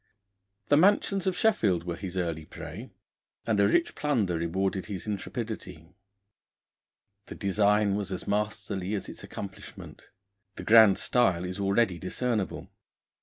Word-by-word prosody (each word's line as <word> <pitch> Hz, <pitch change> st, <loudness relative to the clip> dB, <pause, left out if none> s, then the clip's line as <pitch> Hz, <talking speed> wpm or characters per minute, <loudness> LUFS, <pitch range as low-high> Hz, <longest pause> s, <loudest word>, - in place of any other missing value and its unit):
The 145 Hz, -, +5 dB
mansions 195 Hz, +1 st, +3 dB
of 185 Hz, -1 st, 0 dB
Sheffield 140 Hz, -, +2 dB
were 85 Hz, -1 st, -4 dB
his 95 Hz, +1 st, -6 dB
early 85 Hz, -3 st, -2 dB
prey, -, -, -9 dB, 0.6 s
and 110 Hz, -3 st, +1 dB
a 100 Hz, -, +5 dB
rich 170 Hz, +11 st, +2 dB
plunder 115 Hz, -, 0 dB
rewarded 95 Hz, +3 st, -1 dB
his 100 Hz, -4 st, -6 dB
intrepidity. 100 Hz, -, -6 dB, 1.3 s
The -, -, -8 dB
design 100 Hz, +1 st, +2 dB
was 100 Hz, -1 st, -3 dB
as 95 Hz, -, -5 dB
masterly 105 Hz, -1 st, -2 dB
as 100 Hz, -, -4 dB
its -, -, -9 dB
accomplishment. 95 Hz, -2 st, -9 dB, 0.5 s
The -, -, -7 dB
grand 110 Hz, -3 st, +7 dB
style 95 Hz, -8 st, +2 dB
is 90 Hz, +2 st, -5 dB
already 100 Hz, -2 st, +1 dB
discernible. 105 Hz, +2 st, -3 dB
100 Hz, 130 wpm, -28 LUFS, 90-110 Hz, 1.3 s, grand